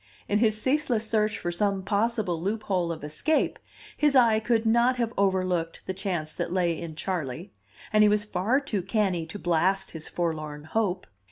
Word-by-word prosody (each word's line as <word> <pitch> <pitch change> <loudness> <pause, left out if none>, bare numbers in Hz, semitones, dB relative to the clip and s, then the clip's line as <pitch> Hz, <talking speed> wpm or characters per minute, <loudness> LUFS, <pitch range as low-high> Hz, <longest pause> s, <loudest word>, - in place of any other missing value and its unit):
In 205 - +2
his 215 -2 +3
ceaseless 260 -3 +1
search 215 -1 +1
for 175 - -3
some 195 +2 0
possible 205 -4 0
loophole 190 -3 -1
of 160 -2 -6
escape, 155 - 0 0.4
his 295 -2 +2
eye 230 -4 +5
could 225 0 +1
not 235 +3 +4
have 235 -2 -1
overlooked 185 -4 0
the 190 - -3
chance 180 -5 -3
that - - -3
lay 175 -2 +1
in 165 -2 -6
Charley, 170 +1 -4 0.4
and 215 - +5
he 210 - +7
was 210 0 +2
far 210 +6 +1
too 255 -9 -1
canny 190 -4 0
to 185 - -6
blast 180 +2 +1
his 160 -1 -7
forlorn 155 -3 -3
hope. 185 +2 -1
195 Hz, 175 wpm, -27 LUFS, 175-220 Hz, 0.4 s, he